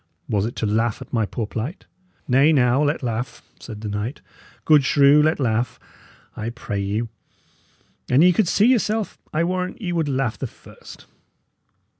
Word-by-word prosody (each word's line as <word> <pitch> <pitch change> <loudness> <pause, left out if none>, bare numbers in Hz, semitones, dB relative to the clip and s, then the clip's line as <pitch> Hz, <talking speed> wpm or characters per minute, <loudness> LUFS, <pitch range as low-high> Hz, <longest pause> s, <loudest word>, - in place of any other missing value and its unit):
"Was 105 0 0
it 120 - -7
to - - -2
laugh 110 +2 0
at - - -22
my 110 -3 +1
poor 115 - -3
plight?" 120 - -5 0.4
"Nay, 135 +5 +4
now, 130 -2 +3
let 150 0 0
laugh," 120 0 -4 0.2
said 105 -3 -9
the 110 - -5
knight. 105 +6 -4 0.5
"Good 150 -3 +5
shrew, 140 +2 +5
let 155 +1 +2
laugh, 120 -2 -1 0.6
I 110 - -4
pray 115 -4 -5
you. 105 +4 -2 1.0
An 135 +5 +5
ye 180 0 +6
could 205 +1 +2
see 205 - +3
yourself, 225 -3 +1
I 155 +2 +1
warrant 180 +1 -2
ye 185 -6 -3
would 165 -3 0
laugh 130 -4 -1
the - - -3
first." - - -15
130 Hz, 170 wpm, -22 LUFS, 110-155 Hz, 1.0 s, ye